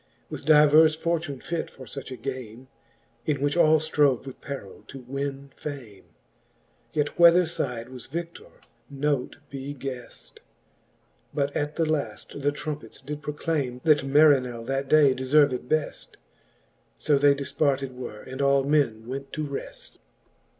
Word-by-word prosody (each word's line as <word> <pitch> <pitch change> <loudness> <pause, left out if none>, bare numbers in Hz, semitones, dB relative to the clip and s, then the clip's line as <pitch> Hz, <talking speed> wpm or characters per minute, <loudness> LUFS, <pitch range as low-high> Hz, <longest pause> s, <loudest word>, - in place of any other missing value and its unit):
With - - -7
divers 155 +1 +6
fortune 160 -4 -2
fit 170 -1 -3
for 130 - -12
fuch 140 -1 -8
a 130 - -6
game, 130 -2 -7 0.6
In 150 -3 +1
which 145 +2 0
all 160 -2 +5
ftrove 145 -5 +2
with 135 - -10
perill 135 -9 -8
to 135 - -9
winne 140 +2 -5
fame. 125 -10 -8 0.9
Yet 150 +1 -2
whether 170 +1 +7
fide 125 -8 -4
was 130 -2 -10
vi£i:or 170 +4 -7 0.4
note 140 -2 -1 0.2
be 140 +1 -6
gheft: 130 -2 -8 1.0
But 140 -1 -1
at 145 0 -2
the 165 - +1
laft 155 -2 -3
the 145 +1 +1
trompets 145 -5 -6
did 145 +2 -7
proclame 150 -4 -2
That 155 -4 +4
Marinell 135 -5 +4
that 135 +1 -2
day 150 -3 +6
delerved 130 -1 +2
beft. 155 -1 -2 0.8
So 145 -2 +2
they 140 0 +5
dl 140 0 -7
(parted 135 -3 +1
were, 120 -4 -8
and 130 +1 -6
all 140 0 +3
men 135 -6 +1
went 135 +2 -6
to 155 - -2
reft. - - -7
140 Hz, 145 wpm, -26 LUFS, 130-150 Hz, 1.0 s, whether